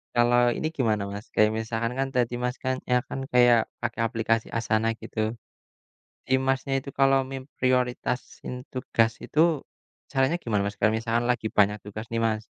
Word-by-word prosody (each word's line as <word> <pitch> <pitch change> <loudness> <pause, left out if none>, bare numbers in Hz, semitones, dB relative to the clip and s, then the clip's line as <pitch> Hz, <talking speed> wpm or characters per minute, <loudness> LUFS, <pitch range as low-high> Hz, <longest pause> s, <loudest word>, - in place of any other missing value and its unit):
Kalau 120 0 +4
ini 155 - -1
gimana 110 -6 +1
Mas, 100 +2 -7
kayak 105 0 +5
misalkan 115 +1 -2
kan 135 - +1
tadi 120 -1 +1
Mas 125 0 -1
kan 130 0 0
ya 125 - +5
kan 135 - -4
kayak, 120 -1 +6 0.2
pakai 120 -1 -2
aplikasi 115 0 0
Asana 115 -1 +1
gitu. - - -7 1.1
Si 130 - +1
Masnya 135 +1 0
itu 140 - -12
kalau 135 0 +5
memprioritasin 125 -2 -2 0.2
tugas 115 -3 +1
itu, 155 - 0 0.7
caranya 135 +4 +2
gimana 105 -4 0
Mas? 100 +1 -3
Kalau 110 +1 +4
misalkan 115 +1 0
lagi 120 -3 0
banyak 105 +1 +4
tugas 105 +2 -7
nih 115 - -3
Mas, 110 0 -2
120 Hz, 160 wpm, -26 LUFS, 110-130 Hz, 1.1 s, kayak